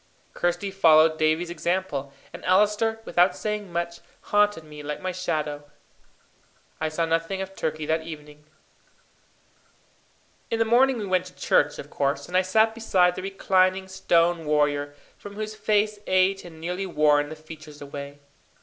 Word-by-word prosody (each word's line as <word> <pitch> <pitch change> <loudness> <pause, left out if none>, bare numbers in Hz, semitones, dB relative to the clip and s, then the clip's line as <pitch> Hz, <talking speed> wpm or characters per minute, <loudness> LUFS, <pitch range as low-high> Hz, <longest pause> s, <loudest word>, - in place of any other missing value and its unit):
Kirsty 175 +3 -1
followed 160 -4 +5
Davie's 160 +2 +1
example, 175 -6 -2 0.2
and - - -9
Allister, 210 +4 +2
without 175 +2 +3
saying 210 -3 -4
much, 170 0 -3 0.3
haunted 205 -5 +3
me 150 -1 -11
like 150 0 -5
my 185 0 -3
shadow. 155 -5 -3 1.2
I 155 - -1
saw 165 +2 -1
nothing 165 +4 -1
of 190 0 -6
Turkey 155 -2 -3
that 160 +1 0
evening. 150 -2 -11 2.0
In 230 - 0
the 225 - +2
morning 250 +3 +4
we 210 - -4
went 185 -1 +1
to 180 - -15
church, 145 0 +2
of 145 - -9
course, 140 0 -1
and 180 - -6
I 185 - +6
sat 220 +4 +2
beside 190 -6 +2
the 185 - -6
reclining 190 -1 +1
stone 170 -2 +1
warrior, 145 -1 +1 0.2
from 205 0 -10
whose 215 0 -4
face 215 -1 0
age 185 +1 +2
had 175 - -12
nearly 180 +4 -4
worn 150 -3 +3
the 155 - -7
features 155 -1 -12
away. 140 0 -8
175 Hz, 155 wpm, -25 LUFS, 155-195 Hz, 2.0 s, I